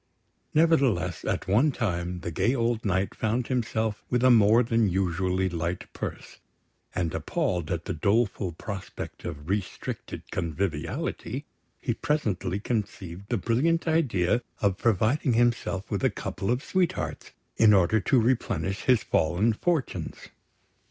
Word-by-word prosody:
Nevertheless, 140 - +3
at - - -1
one 120 +11 +4
time, 90 -7 -2
the 85 - -4
gay 120 - +1
old 115 -2 0
Knight 95 -1 0
found 115 +3 -1
himself 110 -4 -1
with 125 0 +1
a 130 - +7
more 115 +1 +6
than 115 -2 +2
usually 95 0 0
light 85 0 -3
purse; - - -6 0.6
and 85 -2 -1
appalled 95 - -1
at 85 -2 -2
the 95 - -2
doleful 100 +2 +1
prospect 95 +4 -7
of 75 +1 -6
restricted 100 0 -4
conviviality, 85 -1 -3 0.3
he - - -1
presently 110 - -1
conceived 100 -4 -4
the 120 - +1
brilliant 140 - +1
idea 125 - +2 0.2
of 100 -2 +1
providing 120 - +2
himself 115 -4 +1
with - - -1
a - - +5
couple 95 +2 -4
of 125 +3 +1
sweethearts, 180 +1 -1 0.3
in 110 -2 +7
order 100 +2 +4
to 125 +6 +3
replenish 110 -4 0
his 125 -4 +4
fallen 90 +8 +2
fortunes. 160 +3 -2
105 Hz, 135 wpm, -27 LUFS, 90-120 Hz, 0.6 s, a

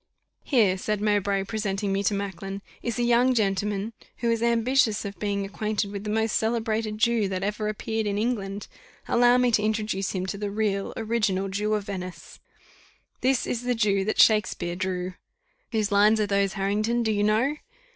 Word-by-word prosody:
"Here," 210 -9 +3
said 210 +1 -1
Mowbray, 205 -2 +1
presenting 200 -1 -2
me 195 - +1
to 205 - +2
Macklin, 195 0 -5 0.2
"is 235 -1 -3
a 240 - +1
young 240 +2 +4
gentleman, 205 0 0 0.2
who 235 -1 0
is 230 -1 0
ambitious 235 -1 +2
of 200 -3 -6
being 200 -1 -1
acquainted 210 0 -2
with 200 0 -6
the - - -3
most 220 +1 +1
celebrated 220 -1 -1
Jew 225 -1 +2
that 190 0 -3
ever 210 +1 -2
appeared 220 +1 -2
in 200 0 -1
England. 205 -3 -2 0.4
Allow 245 +1 +5
me 250 -1 +3
to 215 - +3
introduce 210 -3 -1
him 185 -1 -2
to 195 +1 -4
the 205 -1 -2
real, 200 -1 -1
original 210 -4 0
Jew 210 +2 0
of 210 - -2
Venice: 185 -3 -7 0.8
'This 260 -1 +2
is 240 - -2
the 245 0 0
Jew 200 -4 +2
That 215 - -2
Shakspeare 190 -5 +3
drew!' 185 0 -3 0.6
Whose 215 -3 0
lines 210 +2 +5
are 210 - +2
those, 200 -1 +1
Harrington? 215 +4 0
do 220 - +1
you 205 -1 +1
know?" 230 +8 +2
210 Hz, 180 wpm, -26 LUFS, 195-225 Hz, 0.8 s, Allow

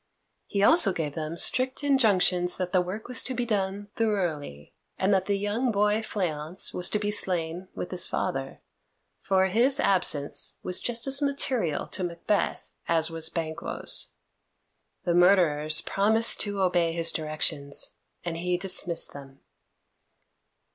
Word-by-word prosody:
He 200 -1 -1
also 210 - +6
gave 150 -4 -3
them 160 +1 -5
strict 255 - +2
injunctions 195 -10 +2
that 180 -1 -3
the 185 - +4
work 190 +5 -6
was 250 -1 0
to 260 - -3
be 245 0 -2
done 205 -2 -2
thoroughly, 170 - -3 0.2
and 195 +2 +1
that 190 -1 +1
the 200 -1 +1
young 210 +5 -1
boy 210 +1 +1
Fleance 180 -5 -2
was 180 - -2
to - - 0
be 205 0 -2
slain 180 -3 0
with - - -6
his 180 -1 -1
father, 135 0 -4 0.6
for 190 -1 +1
his 240 +9 +3
absence 165 -7 +1
was 180 - -2
just 235 -1 0
as 275 +1 +3
material 260 - -1
to 185 - -4
Macbeth 175 +4 -2
as 165 0 +2
was 165 -1 -4
Banquo's. 160 -1 -3 1.0
The 175 - 0
murderers 165 -4 +4
promised 220 +3 +3
to 205 -2 -1
obey 175 -3 +1
his 165 0 +2
directions, 150 -2 -2 0.3
and 165 -1 -3
he 180 +1 -1
dismissed 175 -2 +1
them. 140 -1 -12
185 Hz, 145 wpm, -26 LUFS, 165-210 Hz, 1.0 s, also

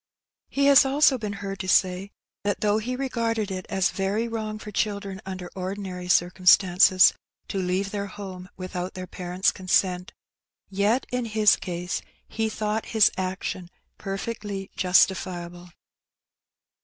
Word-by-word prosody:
He 280 0 +1
has 280 -1 +8
also 270 -1 +3
been 210 -2 -4
heard 195 0 -5
to 190 - -4
say, 185 +1 +2 0.3
that 205 -1 -1
though 210 0 +2
he 245 +4 -3
regarded 230 -5 -2
it 185 -1 -5
as 190 -2 +1
.very 200 +4 -1
wrong 215 -2 -4
for 210 0 -9
children 200 -2 -2
under 185 -2 -6
ordinary 185 -1 -5
circumstances, 180 +1 +5 0.4
to 195 - -2
leave 185 +2 -1
their 200 -1 -3
home 185 -2 -9
without 185 0 -5
their 185 0 -5
parents' 180 +1 -1
consent, 185 0 0 0.6
yet 205 +6 +1
in 250 -1 -1
his 215 -2 +4
case 175 -1 -4 0.3
he 220 -1 -2
thought 215 0 -2
his 215 - +6
action 185 -1 -4 0.3
per 195 0 -4
fectly 205 -3 -5
justifiable. 180 -1 +1
195 Hz, 140 wpm, -25 LUFS, 185-215 Hz, 0.6 s, has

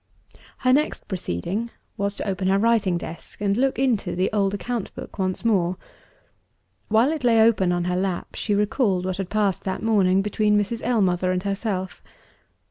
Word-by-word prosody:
Her 255 -1 +2
next 300 +3 0
proceeding 190 - -3 0.3
was 200 -1 -2
to - - -5
open 190 -1 -1
her 195 +1 +3
writing 210 -4 +2
desk, 170 -1 -9
and 200 -1 +1
look 265 +3 +1
into 255 -9 0
the 185 +2 0
old 200 -2 +2
account 225 +2 -4
book - - -9
once 185 +3 -2
more. 185 -5 +2 1.1
While 225 +6 +3
it 310 -4 -4
lay 230 -2 +4
open 220 -5 +4
on 175 0 0
her 180 0 -1
lap, 185 -1 -2
she 210 - -1
recalled 205 -3 +1
what 185 -1 -2
had 195 -2 -4
passed 205 -3 0
that 190 - -3
morning, 195 -4 +3
between 210 0 +2
Mrs. 225 +3 -2
Ellmother 185 -6 +1
and 185 0 -1
herself. 195 -2 -3
200 Hz, 175 wpm, -23 LUFS, 185-225 Hz, 1.1 s, lay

